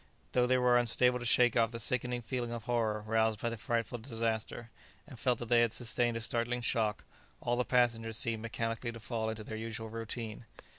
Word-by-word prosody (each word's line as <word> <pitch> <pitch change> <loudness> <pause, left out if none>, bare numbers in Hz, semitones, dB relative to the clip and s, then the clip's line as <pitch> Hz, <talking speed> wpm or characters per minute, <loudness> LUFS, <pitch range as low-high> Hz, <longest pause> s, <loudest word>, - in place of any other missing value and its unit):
Though 125 -1 +3
they 130 +1 +3
were 125 -1 +4
unable 125 +1 +3
to 120 - -6
shake 120 0 +4
off 115 -2 +4
the 115 0 -6
sickening 125 +1 0
feeling 120 0 -3
of 120 -1 -5
horror 115 -3 0
roused 110 -1 +1
by 120 - -1
the - - -3
frightful 115 +2 -2
disaster, 115 -1 -3 0.3
and 135 -6 -12
felt 125 -1 +1
that 120 -1 -7
they 120 -1 +5
had 120 -1 +2
sustained 120 0 +1
a - - -4
startling 120 +2 0
shock, 110 -3 0 0.4
all 120 - 0
the 125 - +1
passengers 115 -3 +2
seemed 115 -4 +1
mechanically 115 +1 -3
to 115 - -9
fall 110 -1 -3
into 110 -1 -5
their 110 +1 -6
usual 110 0 -5
routine. 115 0 -5
115 Hz, 205 wpm, -32 LUFS, 110-120 Hz, 0.4 s, they